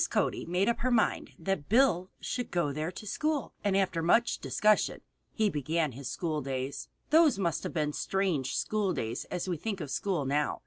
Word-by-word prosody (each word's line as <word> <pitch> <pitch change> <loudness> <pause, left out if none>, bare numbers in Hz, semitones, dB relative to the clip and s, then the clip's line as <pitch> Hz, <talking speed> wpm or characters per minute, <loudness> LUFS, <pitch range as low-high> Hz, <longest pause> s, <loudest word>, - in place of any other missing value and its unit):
Cody - - 0
made 180 +4 +1
up 235 - +1
her 255 - +1
mind 240 -3 +1
that 195 -7 -2
Bill 215 -6 +4
should 245 -2 -3
go 170 -5 0
there 155 +4 -2
to 200 - -9
school, 300 +6 -1
and 200 -2 +2
after 185 -4 +1
much 230 +8 +3
discussion 215 0 +2 0.3
he 220 -1 +1
began 155 -2 0
his 130 +1 -6
school 155 +2 -2
days. 135 0 -4 0.2
Those 315 -6 +6
must 170 -4 0
have - - -5
been 150 -2 0
strange 185 -9 0
school 210 -3 0
days 115 +2 -3
as 180 +1 -4
we 175 -2 -1
think 200 +4 -3
of 150 -5 -5
school 180 -8 -1
now. 145 +2 0
180 Hz, 190 wpm, -30 LUFS, 150-215 Hz, 0.3 s, Those